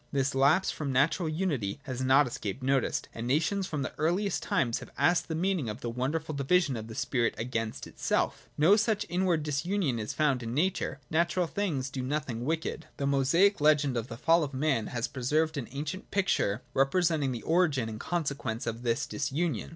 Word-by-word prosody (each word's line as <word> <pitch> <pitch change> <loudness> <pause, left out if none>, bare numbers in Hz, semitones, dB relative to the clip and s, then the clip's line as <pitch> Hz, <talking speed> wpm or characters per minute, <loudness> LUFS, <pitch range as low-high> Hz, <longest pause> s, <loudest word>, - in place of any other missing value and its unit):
This 140 -1 0
lapse 140 +8 +3
from 145 -3 -3
natural 150 +6 +2
unity 150 - -1
has 130 -3 -5
not 135 +3 +5
escaped 120 -1 -5
notice, 135 0 +1
and 115 +1 -5
nations 170 +8 +1
from 150 -3 -2
the - - -4
eariiest 180 +6 +1
times 120 -3 0
have - - -10
asked 175 -1 +3
the 160 - -3
meaning 175 - 0
of 105 +5 -6
the 120 - -3
wonderful 150 +6 -2
division 140 +1 +2
of 110 -1 -6
the 110 - -8
spirit 120 -1 0
against 115 -1 -3
itself. - - -2
No 165 +7 +6
such 220 -1 +1
inward 175 -3 +1
disunion 150 - -1
is 110 - -3
found 145 -5 +1
in 115 +1 -4
nature: 170 -4 0
natural 170 +2 +2
things 160 -8 -2
do 135 - -3
nothing 130 -3 -3
wicked. 160 +1 -2
The 140 - -2
Mosaic 145 +8 +3
legend 150 -3 +4
of 115 0 -2
the 115 - -8
Fall 165 +4 +4
of 140 -2 -5
Man 135 -5 +1
has 120 0 -2
preserved 150 +6 0
an 135 -5 -4
ancient 150 +7 -5
picture 155 - +1
representing 150 0 +2
the 120 -3 -5
origin 160 -8 +2
and 110 -1 -6
consequences 140 -8 -2
of 115 0 -3
this 115 -1 0
disunion. 145 - -2
140 Hz, 190 wpm, -29 LUFS, 125-165 Hz, -, No